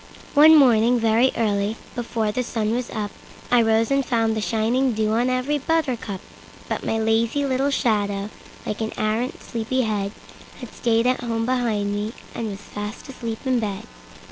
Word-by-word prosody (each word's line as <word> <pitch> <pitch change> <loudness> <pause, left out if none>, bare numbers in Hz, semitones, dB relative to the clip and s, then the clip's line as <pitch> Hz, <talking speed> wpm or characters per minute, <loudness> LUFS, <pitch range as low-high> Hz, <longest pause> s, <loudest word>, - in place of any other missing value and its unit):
One 310 +2 +8
morning, 245 -3 +5
very 230 +3 +3
early, 205 -1 0 0.2
before 230 -3 -2
the 250 - -1
sun 225 -3 -1
was 245 0 -2
up,I 220 +3 -2
rose 225 +2 +2
and 275 0 +3
found 225 -3 +1
the 220 - -1
shining 235 +4 +1
dew 215 0 0
on 240 +3 +2
every 255 +4 0
buttercup; 260 - -1 0.5
But - - -3
my 225 - 0
lazy 225 +5 +1
little 270 +1 +1
shadow, 205 -6 0 0.3
like 210 - -3
an 220 - -2
arrant 220 +4 -1
sleepy 235 +3 -1
head, 205 -3 -1 0.5
Had 245 -4 -9
stayed 230 -1 +1
at 255 0 +2
home 230 -2 -1
behind 225 -5 0
me 210 +2 -3 0.2
and 230 - -3
was 200 0 -7
fast 210 +5 -7
asleep 230 -2 -6
in 255 -2 +2
bed. 205 -4 -3
230 Hz, 170 wpm, -23 LUFS, 215-255 Hz, 0.5 s, One